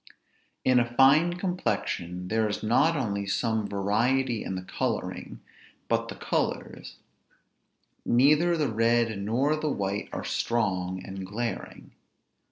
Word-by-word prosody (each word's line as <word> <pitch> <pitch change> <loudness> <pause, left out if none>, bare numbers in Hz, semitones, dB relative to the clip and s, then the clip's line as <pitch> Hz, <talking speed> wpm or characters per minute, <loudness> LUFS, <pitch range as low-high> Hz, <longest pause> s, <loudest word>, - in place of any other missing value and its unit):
In 130 -1 +5
a 120 0 -1
fine 150 +7 +5
complexion 90 - -2
there 110 -1 +1
is 105 - -4
not 145 +9 +3
only 100 -6 -2
some 110 +1 0
variety 115 +5 +1
in 95 - -4
the 95 - -5
coloring, - - -4 0.5
but - - 0
the - - -7
colors: - - -3 1.1
neither 150 +8 +4
the 145 -6 0
red 115 -1 +2
nor 125 +9 +1
the 155 0 -2
white 100 -4 -2
are - - -4
strong 95 -5 -1
and 95 0 -6
glaring. 115 +5 -5
115 Hz, 125 wpm, -27 LUFS, 100-135 Hz, 1.1 s, In